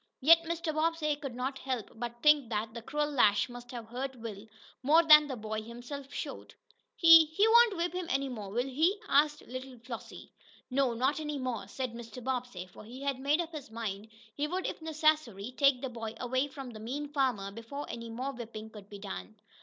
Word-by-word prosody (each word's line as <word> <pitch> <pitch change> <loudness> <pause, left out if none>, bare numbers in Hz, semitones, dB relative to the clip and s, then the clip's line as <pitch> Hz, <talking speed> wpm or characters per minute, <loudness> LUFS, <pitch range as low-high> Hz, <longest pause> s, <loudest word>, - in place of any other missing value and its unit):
Yet 330 +5 +7
Mr. 335 -1 -2
Bobbsey 310 -1 +1
could 275 -4 -7
not 265 +2 -3
help 255 -6 -3
but 240 +1 -6
think 300 -5 +5
that 220 0 -2
the 235 - -6
cruel 295 +5 -1
lash 210 -7 +4
must 245 0 -10
have 240 -2 -7
hurt 265 +3 -4
Will 225 -3 -8 0.3
more 310 +5 +5
than 300 -2 +8
the 265 - -4
boy 220 -1 -4
himself 245 +5 -8
showed. - - -6 0.4
"He 330 -1 +9
he 320 +8 +2
won't 460 -3 +6
whip 345 +1 -1
him 360 -1 -3
any 275 +1 0
more, 215 -6 -6
will 240 +5 -1
he?" 320 +10 +1
asked 295 +1 +3
little 255 +1 -8
Flossie. 235 0 -9 0.4
"No, 260 -2 +2
not 265 +6 +1
any 300 -1 -3
more," 255 -4 -3
said 255 -3 -4
Mr. 235 +1 -9
Bobbsey, 245 -7 -3
for 185 - -14
he 250 +5 -9
had 275 -2 -1
made 290 +5 +2
up 335 -1 -6
his 300 -7 -8
mind 220 -2 -5 0.3
he 290 +4 -1
would, 365 +4 -2
if - - -4
necessary, 305 -9 +1
take 275 -2 +4
the 265 - -2
boy 225 -2 -6
away 260 +3 0
from 270 -3 -8
the 215 - -10
mean 280 +6 -5
farmer 245 -9 0
before 230 +7 -7
any 230 0 -6
more 255 +4 -4
whipping 220 -3 -8
could 205 -2 -12
be 205 - -8
done. 200 +2 -7
260 Hz, 205 wpm, -31 LUFS, 230-300 Hz, 0.4 s, He